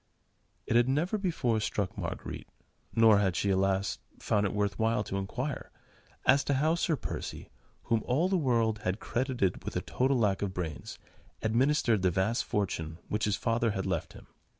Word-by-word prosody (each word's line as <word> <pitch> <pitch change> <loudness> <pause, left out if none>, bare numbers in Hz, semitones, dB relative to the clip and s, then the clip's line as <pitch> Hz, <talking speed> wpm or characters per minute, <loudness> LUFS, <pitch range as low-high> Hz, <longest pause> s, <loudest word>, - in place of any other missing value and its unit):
It - - -1
had 120 +2 +5
never 170 +10 +1
before 140 - 0
struck 100 -3 -2
Marguerite—nor 110 -3 0
had 95 -4 +1
she, 100 +4 +1
alas! 95 +1 +1 0.2
found 105 -1 +1
it - - -4
worth 105 0 -1
while 110 -1 +2
to 95 - -4
inquire—as 130 +4 -2
to 140 - +1
how 155 +4 +2
Sir 165 -1 +1
Percy, - - -6 0.3
whom 115 -2 +1
all 150 +9 +2
the 190 - +1
world 115 - +2
had 95 +1 -2
credited 125 -7 -1
with - - -5
a - - 0
total 130 +1 +1
lack 105 -5 +1
of 95 -2 -2
brains, 80 -4 -5 0.5
administered 115 -1 +2
the 95 - +3
vast 95 +7 0
fortune 80 -6 -2
which 105 +1 0
his 105 -1 +1
father 115 +1 +1
had 95 - -2
left - - -2
him. - - -13
110 Hz, 170 wpm, -30 LUFS, 100-130 Hz, 0.5 s, had